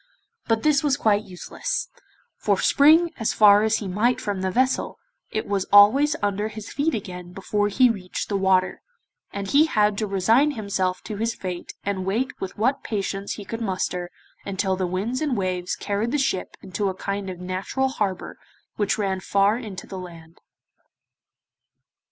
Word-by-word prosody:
But 225 -1 +1
this 300 -2 +3
was 285 -2 +1
quite 215 -5 +2
useless, 485 - -4 0.5
for - - +1
spring 320 +4 +5
as 225 - 0
far 205 -1 +7
as 220 +1 +2
he 205 - -5
might 230 +7 +1
from 205 -6 -3
the 190 - 0
vessel, 255 +6 0 0.3
it 215 - -3
was 200 -2 -1
always 265 +10 +6
under 205 +1 0
his 215 -1 -8
feet 290 +3 0
again 180 -4 -7
before 205 +2 -1
he 250 +5 +4
reached 195 -6 -3
the 205 - -2
water, 190 -1 +2 0.5
and 200 0 -5
he 300 +3 +5
had 210 -6 +2
to 215 - -1
resign 225 +10 +3
himself 190 -3 -2
to 210 - -6
his 230 +2 -1
fate, 180 -2 -6
and 195 -2 -2
wait 230 +9 -1
with 190 - -5
what 255 +6 +1
patience 200 -2 -3
he 205 - -8
could 230 +3 -5
muster 185 -3 -2 0.3
until 195 -1 -1
the 185 -1 -1
winds 205 - -2
and 285 -6 0
waves 185 -2 -2
carried 210 +3 -2
the - - +2
ship 265 -9 -1
into 195 +2 -2
a 190 - -4
kind 200 0 -4
of 180 -1 -7
natural 185 +9 -2
harbour 200 -8 -3 0.4
which 205 -1 +1
ran 195 -3 -1
far 200 +2 +2
into 210 -7 -7
the 190 - -7
land. 165 -2 -11
205 Hz, 175 wpm, -24 LUFS, 190-230 Hz, 0.5 s, far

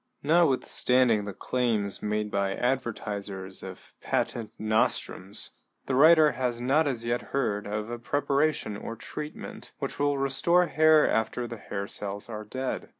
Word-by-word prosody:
= - - -43
Notwithstanding 130 -7 +3
the 100 - -4
claims 110 -4 -1
made 105 0 -1
by 100 -1 0
advertisers 105 -6 -3
of 95 -1 -10
patent 115 -2 -1
nostrums, 110 -2 -1 0.3
the 135 - -2
writer 155 +2 +7
has 125 -3 -2
not 140 +6 +2
as 120 -4 -2
yet 120 +1 0
heard 105 -7 -1
of 105 +2 -3
a 120 - -4
preparation 145 -2 0
or 115 +2 -6
treatment 150 +6 -8
which - - -5
will 145 0 +2
restore 140 +6 +3
hair 155 0 +5
after 110 +2 0
the 115 - -7
hair 100 -1 -5
cells 100 +2 -5
are 110 -1 -5
dead. 130 +5 -4
120 Hz, 150 wpm, -28 LUFS, 105-140 Hz, 0.3 s, writer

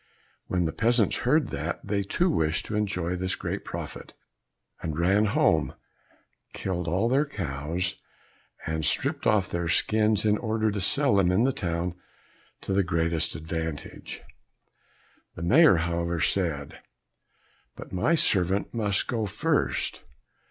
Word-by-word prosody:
When 90 -2 0
the 80 - -1
peasants 115 -2 +2
heard 150 +3 +2
that, - - -3
they 100 -1 0
too 175 - 0
wished 80 - 0
to 105 - -4
enjoy 90 -4 -1
this 95 +1 -1
great - - -4
profit, - - -7 0.7
and 80 -2 -4
ran 95 +5 +3
home, 105 - +2 0.8
killed 90 -2 -3
all 90 +8 +1
their 140 +4 +2
cows, 85 - -3 0.7
and 80 0 -2
stripped - - +1
off 105 -3 +3
their 85 -1 -3
skins 110 +4 +2
in 105 0 +3
order 110 -1 0
to 100 -1 -3
sell 140 +1 +4
them 90 -2 +3
in 95 +6 +3
the 135 - +3
town 85 -2 -2 0.7
to - - -3
the 100 - +3
greatest 85 -3 0
advantage. 80 0 -5 1.1
The 85 - -6
Mayor, 140 - +6
however, 85 0 -1
said, 80 -6 -1 1.0
"But - - -10
my 120 - +2
servant 95 - +1
must 105 -4 0
go 115 -4 -2
first." 140 +10 -1
95 Hz, 140 wpm, -26 LUFS, 85-110 Hz, 1.1 s, Mayor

